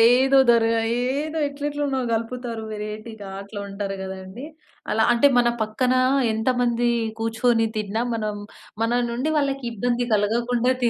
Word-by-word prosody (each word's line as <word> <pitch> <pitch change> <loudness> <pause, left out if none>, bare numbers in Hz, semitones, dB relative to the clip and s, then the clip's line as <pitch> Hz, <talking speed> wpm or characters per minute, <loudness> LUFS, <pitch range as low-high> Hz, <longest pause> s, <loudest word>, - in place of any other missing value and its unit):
ఏదో 270 +1 +5
ద‌ర్ 230 -1 +5 0.3
ఏదో 285 +6 -1
ఎట్లెట్లనో 285 -1 -2
నలుపుతారు 230 0 -3
వేరైటీగా 215 0 -7
అట్లా 200 +1 -8
ఉంటారు 195 0 -4
కదండీ. 190 +5 -7 0.5
అలా 220 - +3
అంటే 240 +4 +5
మన 240 - +4
పక్కన 245 +4 +1 0.4
ఎంతమంది 240 +1 +1 0.3
కూర్చొని 225 +1 +2
తిన్నా 215 +1 -1
మనం, 215 -2 -2 0.5
మన 240 +2 +2
నుండి 250 +6 -1
వాళ్ళకి 275 -2 -1
ఇబ్బంది 240 +2 -1
కలగకుండా 235 +4 +1
తీ 240 - +3
235 Hz, 125 wpm, -23 LUFS, 215-250 Hz, 0.5 s, ఏదో